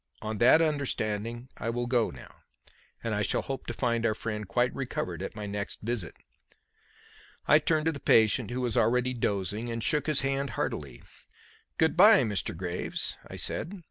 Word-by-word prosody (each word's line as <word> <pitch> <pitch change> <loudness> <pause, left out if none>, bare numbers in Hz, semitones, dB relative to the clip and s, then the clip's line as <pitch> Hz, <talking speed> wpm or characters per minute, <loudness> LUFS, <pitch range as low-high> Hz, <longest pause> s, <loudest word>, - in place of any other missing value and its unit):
"On 110 -1 -4
that 145 +7 +6
understanding 120 -5 -2
I 115 - -3
will 120 +1 -2
go 120 -2 +1
now; - - -13 0.7
and 115 - -1
I 105 - 0
shall 100 - +1
hope 135 -1 -5
to - - -2
find 115 -2 0
our 110 -2 +1
friend 105 -2 -4
quite 120 +6 +1
recovered 135 -2 -4
at - - -5
my 105 - -5
next 100 0 -4
visit." 110 -5 -3 1.3
I 150 - +7
turned 155 0 +1
to 165 - +3
the 145 - -7
patient, 110 -1 +3
who 125 +1 -3
was 120 -3 -1
already 125 +2 +2
dozing, 105 0 -2
and 115 -1 -3
shook 150 -1 +2
his 150 -2 +2
hand 135 0 -1
heartily. 70 -5 -4 0.7
"Good 160 0 +2
bye, 205 0 +7
Mr. 105 -6 -1
Graves!" 90 0 -3
I - - -9
said. 190 +5 -4
120 Hz, 175 wpm, -28 LUFS, 105-135 Hz, 1.3 s, I